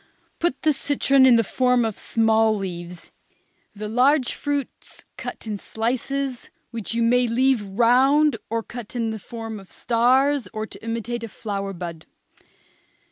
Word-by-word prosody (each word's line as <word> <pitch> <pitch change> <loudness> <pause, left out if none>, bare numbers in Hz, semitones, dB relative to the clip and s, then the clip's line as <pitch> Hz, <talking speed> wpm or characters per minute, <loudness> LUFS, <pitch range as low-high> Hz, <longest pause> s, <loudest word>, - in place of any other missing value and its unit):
Put 335 -6 -1
the 310 - +4
citron 275 -1 +3
in 250 - +7
the 230 - +4
form 250 +2 +2
of 220 -3 -2
small 225 -1 +2
leaves. 175 -2 -7 0.6
The 210 +1 -5
large 255 +4 +3
fruits 285 -2 -4
cut - - -7
in 215 -2 -3
slices, 255 +5 -3 0.2
which 230 -1 -4
you 235 - +2
may 245 +1 +3
leave 255 +1 +2
round 250 +7 +3
or 230 +1 -1
cut 240 0 -9
in 230 -2 -1
the 220 - -5
form 225 0 -7
of 195 -2 -15
stars 255 +2 +2
or 215 0 -3
to - - -12
imitate 230 +1 -3
a - - -4
flower 200 -2 -4
bud. 170 -3 -7
230 Hz, 150 wpm, -23 LUFS, 215-260 Hz, 0.6 s, in